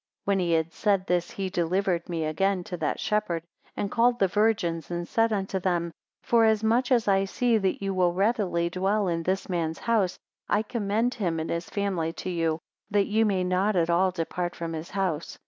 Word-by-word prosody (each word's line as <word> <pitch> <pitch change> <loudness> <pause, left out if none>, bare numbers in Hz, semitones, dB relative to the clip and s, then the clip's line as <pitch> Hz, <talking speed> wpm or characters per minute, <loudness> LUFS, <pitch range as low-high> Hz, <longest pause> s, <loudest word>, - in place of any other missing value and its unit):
21 200 - +1
When 180 - 0
he 170 - +2
had 160 +1 -1
said 200 -3 +1
this, 175 -1 0
he 195 -1 -4
delivered 180 0 0
me 165 -2 -1
again 185 +4 0
to 180 - -6
that 155 -2 -2
shepherd, 210 -6 -1 0.3
and 200 - -2
called 240 +1 +3
the 195 - +3
virgins, 200 -5 0
and 175 0 -3
said 225 0 +2
unto 195 -2 -1
them; 175 -2 0 0.3
Forasmuch 225 +2 +3
as 235 -4 +3
I 195 -1 +3
see 230 +3 +1
that 195 0 -1
ye 195 - 0
will 180 -2 +2
readily 190 -3 +1
dwell 195 +3 +1
in 165 -1 0
this 185 +3 -1
man's 165 -3 -2
house, 215 -6 +1 0.3
I 205 +1 +2
commend 225 +2 0
him 175 -7 -1
and 160 - -3
his 170 +1 -3
family 185 -5 -1
to 185 - -5
you, 165 -2 0 0.3
that 205 -1 +2
ye 220 +2 +2
may 195 -4 +1
not 185 +3 +1
at 170 -1 +2
all 185 +2 +3
depart 175 0 -3
from 165 -1 -4
his 160 +2 -6
house. 185 -5 -2
190 Hz, 200 wpm, -27 LUFS, 170-210 Hz, 0.3 s, called